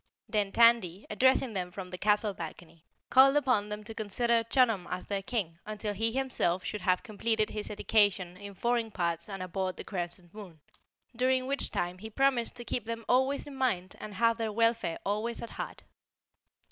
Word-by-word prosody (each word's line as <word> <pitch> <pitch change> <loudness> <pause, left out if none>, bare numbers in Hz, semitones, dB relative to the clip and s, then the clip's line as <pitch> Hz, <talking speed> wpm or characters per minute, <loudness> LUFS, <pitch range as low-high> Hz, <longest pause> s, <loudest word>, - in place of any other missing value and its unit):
Then 205 -2 0
Tandy, 230 -6 +4
addressing 260 +1 +3
them 180 -2 -2
from 180 0 -8
the 180 - -5
castle 210 +1 +3
balcony, 165 -1 -9 0.3
called 270 +2 +7
upon 250 -8 +2
them 210 0 -5
to 225 +1 -8
consider 230 +2 +1
Chunum 230 -6 +2
as 180 - -4
their 200 -1 -2
King 190 -7 -3
until 210 0 -4
he 225 +3 +1
himself 235 -9 0
should 210 - -4
have 180 0 +1
completed 220 -1 0
his 210 -1 -5
education 205 -4 +2
in 200 +1 -9
foreign 235 +2 0
parts 170 -2 -2
and 195 -2 -5
aboard 185 0 -3
the - - -6
Crescent 175 -2 -5
Moon, 195 -7 -11 0.6
during 255 +1 +2
which 275 +1 0
time 175 +1 -3
he 220 +3 -7
promised 260 0 +1
to 240 - -8
keep 240 - -2
them 230 0 -5
always 265 +3 +2
in 290 - -9
mind 205 -9 -1
and 210 -1 -8
have 230 +2 +3
their 225 -1 -1
welfare 230 -5 +1
always 215 +4 -1
at 235 - -7
heart. - - -6
215 Hz, 185 wpm, -30 LUFS, 185-235 Hz, 0.6 s, called